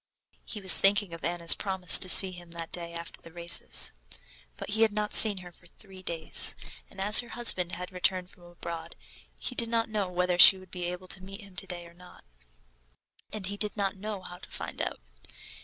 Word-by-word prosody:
He 215 - -9
was 190 -3 +2
thinking 200 -2 0
of 165 - -12
Anna's 170 0 +5
promise 190 -3 +3
to 185 - +2
see 190 +1 +6
him 175 -1 -15
that 165 -1 -8
day 170 -1 -9
after 170 0 -9
the 165 - -16
races. 170 0 +1 0.6
But - - -9
he 220 +2 -3
had 225 -1 +2
not 210 0 -5
seen 210 -3 +7
her 175 - -13
for 170 0 -22
three 190 +1 -16
days, 165 -3 +5 0.3
and - - -17
as 205 +2 +7
her 240 - -7
husband 195 -7 -2
had 180 0 -6
just - - -26
returned 180 0 -2
from 180 - -23
abroad, 170 -1 -10 0.4
he - - -6
did 235 -2 -3
not 230 -1 -3
know 210 -4 -4
whether 180 0 -3
she 190 - +8
would 185 -1 -18
be 180 -1 -7
able 180 +1 -8
to 190 - -1
meet 195 +3 -13
him 200 -2 -18
today 175 -1 -7
or 170 - -17
not, 180 +1 -19 1.1
and 210 -3 -8
he 200 +2 -7
did 210 +1 -4
not 200 -1 -3
know 205 0 -8
how 180 0 -12
to - - -17
find - - -8
out. - - -6
185 Hz, 215 wpm, -26 LUFS, 175-205 Hz, 1.1 s, she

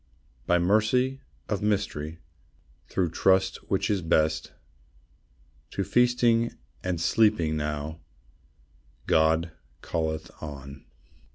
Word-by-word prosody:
By 90 - +4
mercy 110 +9 +2 0.3
of 105 -1 -2
mystery, 95 -7 -1 0.7
Through 90 -4 0
trust 95 +1 +3
which 95 - +1
is 100 -3 0
best, 80 -1 +1 1.2
To - - -2
feasting 120 -1 +3 0.3
and 90 -2 -1
sleeping 85 -3 +3
now, 75 +1 -3 1.1
God 80 +1 +3 0.3
calleth 80 -1 -2
on. 70 -2 -8
85 Hz, 90 wpm, -27 LUFS, 80-105 Hz, 1.2 s, By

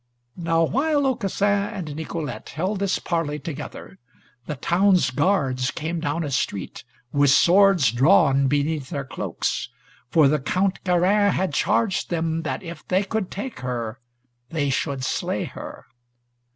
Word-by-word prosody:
Now 165 -1 +1
while 285 - +1
Aucassin 205 -6 0 0.2
and 170 -9 -6
Nicolete 160 0 -5
held 185 +6 -2
this 200 -1 +1
parley 165 -4 -2
together, 150 0 -8 0.5
the 150 - -3
town's 180 +2 +3
guards 135 -4 +1
came 165 +3 -3
down 160 +1 -1
a 145 - -4
street, 100 -7 -3 0.3
with 145 -1 +3
swords 175 - +5
drawn 135 +1 +4
beneath 145 0 0
their 140 -4 -4
cloaks, - - -3 0.4
for 155 0 +5
the 150 +2 +2
Count 185 +8 -1
Garin 195 +3 +3
had 185 -4 -1
charged 200 +5 +1
them 165 -1 -1
that 165 +4 -4
if 170 -2 -8
they 185 +2 +2
could 200 -1 -2
take 220 - -6
her 120 -2 -4 0.5
they 145 -4 -1
should 135 -1 -2
slay 130 - -1
her. - - -9
165 Hz, 140 wpm, -23 LUFS, 140-190 Hz, 0.5 s, swords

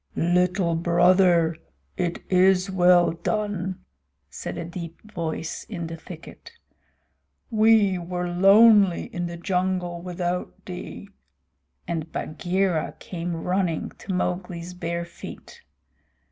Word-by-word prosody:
"Little 180 0 +2
Brother, 170 0 +4 0.4
it 175 -1 -2
is 185 +1 +3
well 180 -1 +5
done," 190 +1 -3 0.5
said - - -6
a 170 - -4
deep 170 -1 -7
voice 165 -2 -4
in 175 -6 -5
the 165 0 -6
thicket. 165 - -12 1.0
"We 215 -4 +4
were 180 +1 -3
lonely 195 +1 +5
in 175 0 -2
the 170 0 -7
jungle 180 -1 -1
without 180 0 -4
thee," 185 +2 -8 0.8
and 165 -2 -3
Bagheera 175 +1 -1
came 175 -1 -5
running 180 0 -1
to 200 - -6
Mowgli's 180 -1 -3
bare 170 -1 -3
feet. 320 - -11
180 Hz, 105 wpm, -25 LUFS, 170-185 Hz, 1.0 s, well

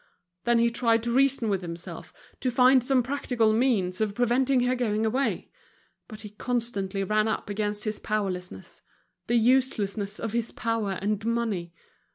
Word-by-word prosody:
Then 240 0 +3
he 235 0 +3
tried 230 -1 +2
to 235 - -1
reason 270 -2 +2
with 195 -3 0
himself, 170 -1 -7 0.3
to 255 - 0
find 255 +1 +5
some 255 -1 +2
practical 245 -4 0
means 220 -6 +1
of 210 -2 -1
preventing 250 +2 +2
her 250 +1 +2
going 225 -3 0
away; 260 +5 -1 0.6
but 215 -1 -10
he 210 -2 -9
constantly 210 -4 -2
ran 215 +2 +1
up 215 -2 -3
against 210 0 -2
his 215 -1 -3
powerlessness, 185 - -4 0.5
the 240 - +1
uselessness 220 -4 +1
of 225 -1 -4
his 235 -1 -1
power 225 -4 -2
and 210 0 -1
money. 220 -7 -2
225 Hz, 160 wpm, -26 LUFS, 205-245 Hz, 0.6 s, find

